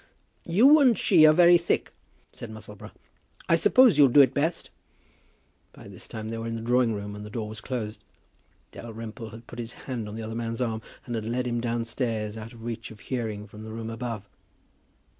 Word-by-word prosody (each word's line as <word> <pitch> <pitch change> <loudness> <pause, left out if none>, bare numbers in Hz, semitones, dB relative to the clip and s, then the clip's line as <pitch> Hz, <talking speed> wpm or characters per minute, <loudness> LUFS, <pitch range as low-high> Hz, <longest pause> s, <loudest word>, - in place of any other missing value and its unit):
"You 250 - +6
and 255 -6 +5
she 160 -5 +6
are - - +8
very 175 +2 +6
thick," 170 - -1 0.4
said 120 - -9
Musselboro. 105 -1 -10 0.6
"I 165 - +5
suppose 230 - +5
you'll 140 - +8
do 135 +3 +7
it 130 -1 +4
best." 155 +5 -1 1.0
By - - -13
this - - -10
time 110 0 -6
they 115 0 -4
were 115 - -4
in 115 - -3
the 115 - -5
drawing 120 -1 +2
room, 105 0 -6
and 105 - -8
the 105 - -8
door 110 -1 -4
was 105 0 -8
closed. 110 -3 -5 0.7
Dalrymple 115 0 -8
had 115 +2 -12
put 120 - -10
his 115 0 -6
hand 120 -5 -6
on 105 - -7
the 115 - -5
other 110 +1 -5
man's 115 0 -4
arm, 115 -3 -1 0.2
and 120 - -5
had 110 -2 -3
led 125 +2 -1
him 120 -1 -1
downstairs, 115 -2 -2
out 110 0 -8
of 115 -1 -12
reach 115 0 -5
of 110 - -13
hearing 110 -5 -4
from 105 +1 -12
the 110 - -8
room 115 0 -6
above. 115 -3 -5
115 Hz, 205 wpm, -26 LUFS, 110-125 Hz, 1.0 s, are